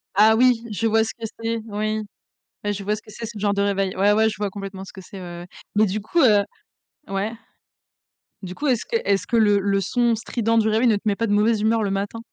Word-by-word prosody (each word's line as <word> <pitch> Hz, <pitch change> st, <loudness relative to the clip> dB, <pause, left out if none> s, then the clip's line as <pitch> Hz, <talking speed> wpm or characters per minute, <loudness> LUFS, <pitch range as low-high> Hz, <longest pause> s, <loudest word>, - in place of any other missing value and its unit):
Ah 215 Hz, +2 st, +6 dB
oui! 245 Hz, -1 st, +3 dB
Je 225 Hz, +2 st, 0 dB
vois 220 Hz, 0 st, +3 dB
ce 220 Hz, -, -3 dB
que 230 Hz, -, -6 dB
c'est, 230 Hz, 0 st, -1 dB
oui. 215 Hz, +1 st, -2 dB, 0.6 s
Ouais, 205 Hz, 0 st, 0 dB
je 200 Hz, 0 st, -6 dB
vois 210 Hz, +2 st, 0 dB
ce 215 Hz, -, -10 dB
que 215 Hz, -, -15 dB
c'est, 230 Hz, +3 st, -7 dB
ce 225 Hz, -1 st, -8 dB
genre 205 Hz, 0 st, +1 dB
de 200 Hz, -, 0 dB
réveil. 195 Hz, -1 st, 0 dB
Ouais, 200 Hz, +2 st, +3 dB
ouais 220 Hz, +1 st, +3 dB
je -, -, -6 dB
vois 205 Hz, 0 st, -2 dB
complètement 195 Hz, -1 st, -7 dB
ce -, -, -13 dB
que 190 Hz, -, -10 dB
c'est, 195 Hz, +2 st, -11 dB
ouais, -, -, -9 dB, 0.2 s
ouais. 175 Hz, -, -10 dB, 0.3 s
Mais 215 Hz, +1 st, +5 dB
du 210 Hz, +2 st, -2 dB
coup 220 Hz, +12 st, -1 dB
heu 210 Hz, -5 st, +5 dB, 0.7 s
ouais 195 Hz, +3 st, -2 dB, 1.1 s
du 180 Hz, -1 st, -6 dB
coup 295 Hz, -, -3 dB
est-ce 250 Hz, -5 st, +1 dB
que 470 Hz, -, 0 dB
est-ce 200 Hz, -1 st, +1 dB
que 235 Hz, -, -1 dB
le 205 Hz, -2 st, +4 dB
le 195 Hz, 0 st, +1 dB
son 235 Hz, +5 st, +1 dB
strident 230 Hz, 0 st, -1 dB
du 220 Hz, 0 st, +2 dB
réveil 220 Hz, +3 st, +2 dB
ne 225 Hz, -, +4 dB
te 200 Hz, -, -4 dB
met 205 Hz, -2 st, +2 dB
pas 230 Hz, -, -1 dB
de 205 Hz, -, +1 dB
mauvaise 210 Hz, +1 st, +2 dB
humeur 220 Hz, +1 st, +2 dB
le 200 Hz, -, 0 dB
matin? 200 Hz, +3 st, -3 dB
210 Hz, 265 wpm, -22 LUFS, 200-225 Hz, 1.1 s, Ah